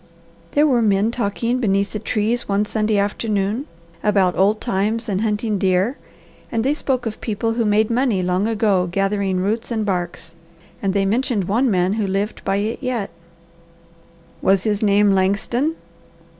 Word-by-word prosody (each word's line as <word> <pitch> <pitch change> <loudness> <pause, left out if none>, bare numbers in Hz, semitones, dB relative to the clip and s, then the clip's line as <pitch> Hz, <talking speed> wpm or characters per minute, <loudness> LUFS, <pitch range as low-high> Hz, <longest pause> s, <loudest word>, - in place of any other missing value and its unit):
"There 295 +1 +4
were 255 -5 +3
men 210 0 +2
talking 235 +2 -1
beneath 200 -4 +1
the 215 - -2
trees 220 +2 -1
one 200 +1 +2
Sunday 215 0 0
afternoon 205 +4 -1 0.3
about 195 -4 +2
old 205 +3 +2
times 220 +1 -1
and 200 -2 -1
hunting 215 -1 -1
deer, 190 +7 +1 0.6
and 225 -1 0
they 275 +3 +2
spoke 265 -5 -2
of 220 -1 -5
people 225 +1 -1
who 230 0 0
made 215 +2 +2
money 230 -6 +1
long 180 +3 +1
ago 205 -5 +1
gathering 195 0 0
roots 215 +4 -1
and 220 -3 -1
barks, 175 -3 -3 0.5
and 195 -1 -1
they 195 -1 +2
mentioned 230 0 0
one 230 +8 +1
man 185 -1 +2
who 215 -2 -1
lived 200 +3 -2
by 195 - 0
it 210 +3 -2
yet." 250 -6 -2 1.3
"Was 195 -1 +3
his 210 -2 0
name 205 -1 +4
Langston?" 200 +10 +1
210 Hz, 160 wpm, -20 LUFS, 195-230 Hz, 1.3 s, There